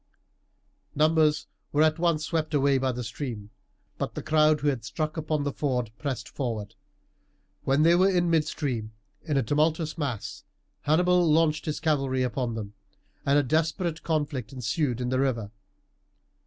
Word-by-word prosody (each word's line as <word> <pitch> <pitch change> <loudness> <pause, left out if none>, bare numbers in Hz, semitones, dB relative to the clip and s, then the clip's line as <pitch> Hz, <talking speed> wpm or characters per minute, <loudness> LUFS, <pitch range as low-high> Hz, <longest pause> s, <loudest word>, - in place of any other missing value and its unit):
Numbers 155 0 +3 0.3
were 150 +1 +3
at 155 +1 +2
once 165 -3 +1
swept 160 -2 -1
away 140 -1 +3
by 130 0 +1
the 125 0 -4
stream, 115 -2 -6 0.5
but - - -3
the - - -5
crowd 155 -1 +3
who 145 - 0
had 130 -6 -2
struck 155 +6 -3
upon 155 -2 -1
the 145 -1 -2
ford 125 -6 -1
pressed 140 -4 -3
forward. 110 -5 -4 0.9
When 135 +3 +3
they 165 +1 +6
were 185 +3 +5
in 175 -2 +2
midstream 140 -8 -1 0.3
in 150 -4 -1
a 135 - +2
tumultuous 155 +5 0
mass 130 -8 -4 0.4
Hannibal 175 +2 +3
launched 155 -1 +2
his 150 - -2
cavalry 135 -5 +1
upon 125 -1 -2
them, 105 -2 -6 0.5
and 140 +1 +4
a 145 - +4
desperate 160 +4 0
conflict 145 -7 -2
ensued 125 0 -1
in 125 - -1
the 130 0 +1
river. 115 -6 -1
145 Hz, 155 wpm, -27 LUFS, 125-155 Hz, 0.9 s, they